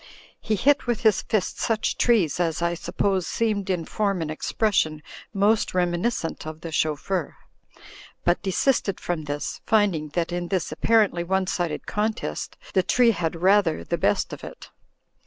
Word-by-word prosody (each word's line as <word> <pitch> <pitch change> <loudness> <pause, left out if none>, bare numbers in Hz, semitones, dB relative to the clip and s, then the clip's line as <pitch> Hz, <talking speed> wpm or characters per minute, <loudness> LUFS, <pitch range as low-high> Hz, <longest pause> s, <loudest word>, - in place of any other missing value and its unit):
He 215 - -1
hit 280 +6 +2
with 240 -3 0
his 220 -4 +4
fist 210 -4 -1
such 220 -1 0
trees, 200 - +2
as, 165 -3 0
I 170 0 0
suppose, 185 +2 -1
seemed 210 -4 -1
in 175 -3 -1
form 200 -1 -1
and 155 - -4
expression 155 -3 0 0.3
most 205 0 +2
reminiscent 175 -1 -1
of 155 0 -7
the 165 - -6
chauffeur; 155 +3 -1 0.9
but 175 - +2
desisted 200 +1 +1
from 170 -3 -3
this, 145 0 -4
finding 195 -9 +2
that 170 -1 0
in 175 0 -2
this 185 -4 -1
apparently 195 +1 +2
one 190 +2 0
sided 175 -3 -2
contest 210 - -3 0.2
the 190 - +4
tree 240 +5 +4
had 170 -5 -2
rather 190 -4 +3
the 170 - -2
best 100 -8 +1
of - - -8
it. - - -10
185 Hz, 155 wpm, -24 LUFS, 165-210 Hz, 0.9 s, his